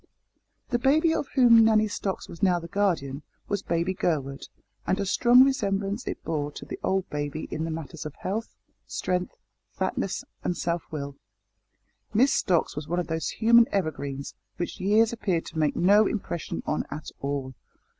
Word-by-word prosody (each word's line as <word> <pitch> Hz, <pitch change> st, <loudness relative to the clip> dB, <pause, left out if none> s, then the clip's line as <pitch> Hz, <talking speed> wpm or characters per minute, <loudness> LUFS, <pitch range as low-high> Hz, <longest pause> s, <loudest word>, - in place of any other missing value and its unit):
The 240 Hz, -1 st, +1 dB
baby 310 Hz, +6 st, +3 dB
of 285 Hz, -, -1 dB
whom 235 Hz, -4 st, +7 dB
Nanny 215 Hz, -1 st, +4 dB
Stocks 200 Hz, -2 st, -3 dB
was 170 Hz, -, -11 dB
now 185 Hz, -3 st, +4 dB
the 170 Hz, -1 st, -6 dB
guardian 165 Hz, -8 st, 0 dB, 0.3 s
was 205 Hz, -2 st, -1 dB
baby 170 Hz, +2 st, 0 dB
Gurwood, 150 Hz, -8 st, -2 dB, 0.4 s
and 190 Hz, -, +1 dB
a 200 Hz, -, 0 dB
strong 240 Hz, +6 st, +6 dB
resemblance 205 Hz, -5 st, 0 dB
it -, -, -4 dB
bore 150 Hz, -2 st, -2 dB
to -, -, -8 dB
the -, -, -7 dB
old 190 Hz, -1 st, 0 dB
baby 145 Hz, +1 st, -3 dB
in 160 Hz, -, -2 dB
the -, -, -3 dB
matters 160 Hz, -1 st, -6 dB
of 155 Hz, -1 st, -7 dB
health, 215 Hz, +4 st, -4 dB, 0.3 s
strength, 180 Hz, 0 st, -2 dB, 0.3 s
fatness, -, -, -2 dB, 0.2 s
and 175 Hz, -, -1 dB
self 170 Hz, -1 st, -2 dB
will. 140 Hz, -2 st, -5 dB, 1.0 s
Miss 260 Hz, +6 st, +5 dB
Stocks 175 Hz, -3 st, +1 dB
was 150 Hz, 0 st, -5 dB
one 175 Hz, +2 st, 0 dB
of 175 Hz, -, -1 dB
those 160 Hz, 0 st, -1 dB
human 235 Hz, +1 st, +5 dB
evergreens 140 Hz, -7 st, -3 dB, 0.2 s
which 175 Hz, -, -4 dB
years 215 Hz, +4 st, +3 dB
appear 200 Hz, -7 st, 0 dB
to 160 Hz, -, -6 dB
make 150 Hz, -2 st, +2 dB
no 205 Hz, +4 st, +5 dB
impression 175 Hz, -6 st, -4 dB
on 150 Hz, -, 0 dB
at 155 Hz, +1 st, -7 dB
all. 140 Hz, -1 st, -3 dB
180 Hz, 170 wpm, -26 LUFS, 155-215 Hz, 1.0 s, whom